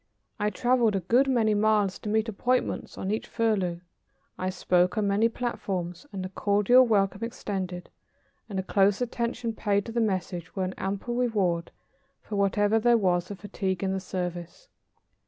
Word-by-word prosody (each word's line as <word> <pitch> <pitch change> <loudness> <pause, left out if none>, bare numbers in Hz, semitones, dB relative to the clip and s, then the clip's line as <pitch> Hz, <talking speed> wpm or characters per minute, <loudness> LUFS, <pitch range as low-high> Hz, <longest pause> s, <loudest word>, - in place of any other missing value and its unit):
I 210 0 +1
traveled 240 0 +2
a 195 - 0
good 245 +10 +3
many 230 -5 +2
miles 210 -2 +2
to 210 - -5
meet 220 +1 +1
appointments 245 +4 -1
on 190 - -3
each 215 - -2
furlough. 195 -7 0 0.5
I 185 - -2
spoke 180 0 +1
on 210 -1 +1
many 205 +3 +3
platforms, 195 -5 -4
and 190 -2 -4
the - - -5
cordial 210 +6 +4
welcome 195 -1 +1
extended 190 -7 -4 0.6
and 200 - -4
the 190 - -1
close 195 +1 +2
attention 235 -1 -2
paid 205 -2 0
to - - -6
the 235 +1 0
message 185 -5 -2
were 190 - -1
an 185 0 -2
ample 200 +5 -3
reward 200 -9 0 0.5
for 210 - -6
whatever 205 +2 +2
there 240 +1 +4
was 180 -4 +1
of 200 -2 -8
fatigue 195 -2 -3
in 190 0 0
the 190 - -1
service. 180 - -5
205 Hz, 170 wpm, -27 LUFS, 185-225 Hz, 0.6 s, cordial